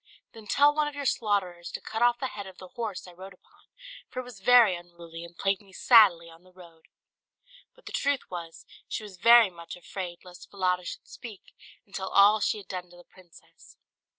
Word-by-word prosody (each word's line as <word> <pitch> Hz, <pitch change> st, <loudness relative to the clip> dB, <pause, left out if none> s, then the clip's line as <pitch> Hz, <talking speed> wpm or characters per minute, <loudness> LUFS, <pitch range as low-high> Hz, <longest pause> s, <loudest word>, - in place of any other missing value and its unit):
"Then 220 Hz, -2 st, -14 dB
tell 290 Hz, +7 st, +4 dB
one 300 Hz, 0 st, 0 dB
of 295 Hz, -, -6 dB
your 285 Hz, -1 st, -5 dB
slaughterers 195 Hz, -8 st, -1 dB
to -, -, -4 dB
cut 220 Hz, +1 st, -6 dB
off 240 Hz, 0 st, +4 dB
the 265 Hz, 0 st, -3 dB
head 205 Hz, -2 st, -8 dB
of 190 Hz, -1 st, -13 dB
the 185 Hz, -, -12 dB
horse 220 Hz, -4 st, -5 dB
I -, -, -11 dB
rode 190 Hz, +2 st, -12 dB
upon, -, -, -28 dB, 0.4 s
for 255 Hz, -, -6 dB
it -, -, -4 dB
was 245 Hz, -5 st, -12 dB
very 230 Hz, -2 st, +6 dB
unruly, 170 Hz, -1 st, -11 dB
and 170 Hz, 0 st, -13 dB
plagued 195 Hz, -1 st, 0 dB
me 195 Hz, -2 st, -20 dB
sadly 190 Hz, -8 st, +5 dB
on 165 Hz, 0 st, -16 dB
the 185 Hz, 0 st, -22 dB
road." 170 Hz, -3 st, -17 dB, 0.9 s
But -, -, -23 dB
the -, -, -8 dB
truth 280 Hz, -1 st, -1 dB
was, 170 Hz, -2 st, -8 dB, 0.2 s
she -, -, -5 dB
was 200 Hz, -3 st, -11 dB
very 230 Hz, +1 st, +6 dB
much 170 Hz, -1 st, -10 dB
afraid 180 Hz, 0 st, -8 dB
lest 180 Hz, -1 st, -13 dB
Falada 180 Hz, -2 st, -1 dB
should -, -, -8 dB
speak, 225 Hz, -5 st, -12 dB, 0.3 s
and 200 Hz, -, -26 dB
tell 190 Hz, -1 st, -4 dB
all 205 Hz, +2 st, +5 dB
she 215 Hz, -, 0 dB
had 200 Hz, -3 st, -11 dB
done 180 Hz, -2 st, -6 dB
to 175 Hz, -, -17 dB
the 175 Hz, -, -15 dB
princess. 175 Hz, -2 st, -20 dB
190 Hz, 215 wpm, -27 LUFS, 175-225 Hz, 0.9 s, very